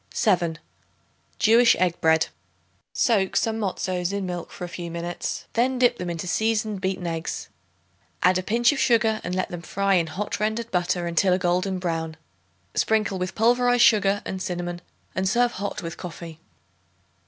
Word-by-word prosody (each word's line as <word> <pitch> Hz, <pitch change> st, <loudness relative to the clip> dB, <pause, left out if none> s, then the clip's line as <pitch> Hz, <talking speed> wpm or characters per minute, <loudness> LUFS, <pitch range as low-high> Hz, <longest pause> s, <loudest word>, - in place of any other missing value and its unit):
7. 175 Hz, -7 st, +2 dB, 0.8 s
Jewish 230 Hz, +2 st, +5 dB
Egg 180 Hz, -2 st, 0 dB
Bread. 160 Hz, 0 st, +4 dB, 0.7 s
Soak 200 Hz, -6 st, +1 dB
some 225 Hz, 0 st, +1 dB
matzoths 185 Hz, -3 st, -2 dB
in 200 Hz, -1 st, -2 dB
milk 175 Hz, -2 st, -5 dB
for -, -, -9 dB
a -, -, -3 dB
few 175 Hz, 0 st, -6 dB
minutes; 170 Hz, +1 st, -4 dB
then 250 Hz, +3 st, +1 dB
dip 245 Hz, -1 st, +3 dB
them 180 Hz, -1 st, -3 dB
into 170 Hz, 0 st, -4 dB
seasoned 215 Hz, +1 st, 0 dB
beaten 190 Hz, -2 st, -2 dB
eggs. 165 Hz, -1 st, -4 dB, 0.7 s
Add 185 Hz, 0 st, +4 dB
a -, -, -1 dB
pinch 235 Hz, +6 st, +3 dB
of 290 Hz, -, -3 dB
sugar 225 Hz, -2 st, +3 dB
and 180 Hz, -, -3 dB
let 185 Hz, -, -1 dB
them 175 Hz, -1 st, -6 dB
fry 200 Hz, +3 st, 0 dB
in 170 Hz, -3 st, +3 dB
hot 195 Hz, +7 st, -4 dB
rendered 220 Hz, +2 st, -1 dB
butter 180 Hz, -1 st, 0 dB
until 170 Hz, +2 st, +2 dB
a -, -, +3 dB
golden 185 Hz, +1 st, 0 dB
brown. 165 Hz, -3 st, -3 dB, 0.6 s
Sprinkle 215 Hz, -3 st, +1 dB
with 185 Hz, +1 st, -3 dB
pulverized 245 Hz, +2 st, +4 dB
sugar 205 Hz, -2 st, +4 dB
and 190 Hz, -1 st, -4 dB
cinnamon 175 Hz, -1 st, -4 dB, 0.3 s
and 190 Hz, 0 st, 0 dB
serve 240 Hz, +3 st, +3 dB
hot 200 Hz, -1 st, -4 dB
with 165 Hz, 0 st, -6 dB
coffee. 165 Hz, -2 st, -8 dB
185 Hz, 165 wpm, -24 LUFS, 175-220 Hz, 0.8 s, Jewish